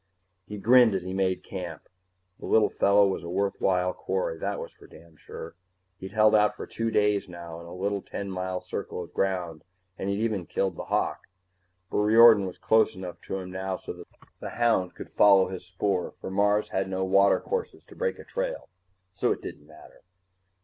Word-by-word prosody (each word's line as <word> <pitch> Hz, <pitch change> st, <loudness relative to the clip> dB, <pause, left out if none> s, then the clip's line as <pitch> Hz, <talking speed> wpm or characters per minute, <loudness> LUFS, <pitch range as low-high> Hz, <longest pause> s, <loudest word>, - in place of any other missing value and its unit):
He 105 Hz, -, -6 dB
grinned 120 Hz, 0 st, +5 dB
as 95 Hz, -, -2 dB
he 95 Hz, +1 st, -5 dB
made 95 Hz, -1 st, 0 dB
camp. 90 Hz, -5 st, -7 dB, 0.5 s
The -, -, -7 dB
little 110 Hz, -1 st, +4 dB
fellow 100 Hz, 0 st, +4 dB
was 95 Hz, -, -2 dB
a 85 Hz, -, -7 dB
worthwhile 90 Hz, -1 st, 0 dB
quarry, 90 Hz, -3 st, -3 dB
that -, -, -2 dB
was -, -, -7 dB
for -, -, -18 dB
damn 80 Hz, 0 st, -17 dB
sure. 80 Hz, +1 st, -9 dB, 0.5 s
He'd 95 Hz, 0 st, -8 dB
held 110 Hz, 0 st, +5 dB
out 105 Hz, -1 st, +4 dB
for -, -, -7 dB
two 115 Hz, 0 st, -3 dB
days 105 Hz, -2 st, +1 dB
now, 85 Hz, -1 st, -8 dB
in 85 Hz, -, -11 dB
a 85 Hz, -, -9 dB
little 100 Hz, +2 st, -2 dB
ten 100 Hz, +1 st, -6 dB
mile 90 Hz, 0 st, -3 dB
circle 90 Hz, -, -5 dB
of 85 Hz, -, -14 dB
ground, 90 Hz, -5 st, -2 dB, 0.4 s
and 95 Hz, -, -2 dB
he'd 100 Hz, -, 0 dB
even 105 Hz, -6 st, -1 dB
killed 95 Hz, -3 st, -1 dB
the -, -, -6 dB
hawk. -, -, -1 dB, 0.6 s
But -, -, -1 dB
Riordan 110 Hz, -1 st, +7 dB
was 90 Hz, -, -8 dB
close 110 Hz, -1 st, +3 dB
enough 90 Hz, -1 st, -8 dB
to 95 Hz, -, -2 dB
him 90 Hz, -1 st, -7 dB
now 95 Hz, 0 st, -3 dB
so -, -, -7 dB
that 90 Hz, -1 st, -12 dB, 0.3 s
the -, -, -6 dB
hound 115 Hz, -7 st, +1 dB
could -, -, -10 dB
follow 100 Hz, -2 st, +5 dB
his 90 Hz, -1 st, -7 dB
spoor, 95 Hz, 0 st, -2 dB
for -, -, -6 dB
Mars 105 Hz, +2 st, +2 dB
had 95 Hz, 0 st, -1 dB
no 95 Hz, 0 st, -1 dB
watercourses 100 Hz, -, +1 dB
to -, -, -16 dB
break 480 Hz, -1 st, -1 dB
a -, -, -10 dB
trail. -, -, -4 dB, 0.4 s
So -, -, 0 dB
it -, -, -3 dB
didn't 75 Hz, -, -9 dB
matter. 75 Hz, 0 st, -16 dB
95 Hz, 200 wpm, -27 LUFS, 90-105 Hz, 0.6 s, Riordan